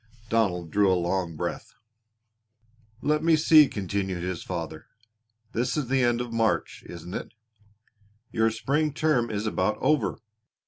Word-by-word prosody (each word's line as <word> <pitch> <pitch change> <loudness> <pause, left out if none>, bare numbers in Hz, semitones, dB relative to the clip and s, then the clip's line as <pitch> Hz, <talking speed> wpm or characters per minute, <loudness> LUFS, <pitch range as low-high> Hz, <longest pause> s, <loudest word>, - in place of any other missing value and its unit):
Donald 90 -7 0
drew 100 -2 +3
a 90 - +3
long 85 -1 -1
breath. - - -5 1.3
"Let 150 +1 +1
me 165 -1 +5
see," 155 -1 +7
continued 95 -3 -3
his 90 -2 -3
father, 80 -3 -6 0.6
"this 120 +6 -1
is 140 -5 -2
the 135 0 +2
end 120 0 +2
of 120 -1 -5
March, 115 -1 0
isn't 85 +1 -9
it? - - -6 1.0
Your 110 0 +2
spring 140 +7 0
term 150 -7 +1
is 105 0 -3
about 105 0 0
over. 150 -8 +1
110 Hz, 140 wpm, -26 LUFS, 90-130 Hz, 1.3 s, see